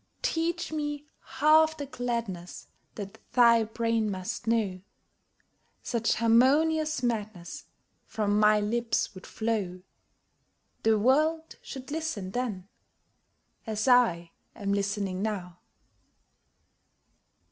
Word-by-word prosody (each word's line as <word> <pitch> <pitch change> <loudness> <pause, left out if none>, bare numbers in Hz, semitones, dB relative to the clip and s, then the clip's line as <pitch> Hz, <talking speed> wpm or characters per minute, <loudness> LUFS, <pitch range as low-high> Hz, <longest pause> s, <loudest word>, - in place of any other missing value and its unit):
Teach 335 +1 -1
me 295 -1 -3
half 315 +3 +3
the 285 - -4
gladness 235 -9 -4 0.3
That 205 +1 -8
thy 235 -2 +6
brain 225 0 0
must 190 +4 -5
know; 210 -5 0 1.0
Such 230 -2 0
harmonious 290 +6 +3
madness 210 -7 -3 0.4
From 210 -1 0
my 210 0 +5
lips 225 +2 -1
would 185 - -11
flow 205 -5 -2 1.0
The 220 -1 +3
world 310 +8 +1
should 265 +1 -9
listen 305 - -3
then 210 -6 -3 1.0
as 215 +1 -2
I 180 -10 +4 0.2
am 200 -1 -2
listening 200 -2 -1
now! 185 -5 -4
230 Hz, 95 wpm, -28 LUFS, 200-265 Hz, 1.0 s, thy